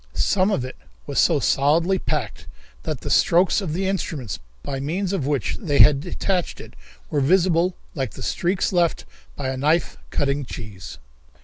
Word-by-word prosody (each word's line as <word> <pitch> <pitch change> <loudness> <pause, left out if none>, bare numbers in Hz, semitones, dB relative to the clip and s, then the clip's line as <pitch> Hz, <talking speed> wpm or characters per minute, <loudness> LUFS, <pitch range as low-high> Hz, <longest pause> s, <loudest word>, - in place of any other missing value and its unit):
Some 190 0 +2
of 130 -12 0
it 130 - -9 0.3
was - - -1
so - - +4
solidly 165 +7 +2
packed 140 -10 -3 0.3
that - - -4
the - - -5
strokes 180 +4 +4
of 180 -6 -3
the 190 +3 -1
instruments 155 - -3 0.2
by 135 -1 -4
means 175 +8 -2
of 150 -9 -1
which 145 -3 -1
they 150 -8 0
had 145 -2 +7
detached 180 +3 -2
it - - -11 0.4
were 145 - +1
visible 175 +3 +3 0.2
like 130 -8 -3
the - - -8
streaks 190 +2 0
left 175 -2 +1 0.3
by 135 -2 -3
a 130 - -3
knife 150 - +1
cutting 140 - 0
cheese. 100 - -8
155 Hz, 170 wpm, -23 LUFS, 135-185 Hz, 0.4 s, had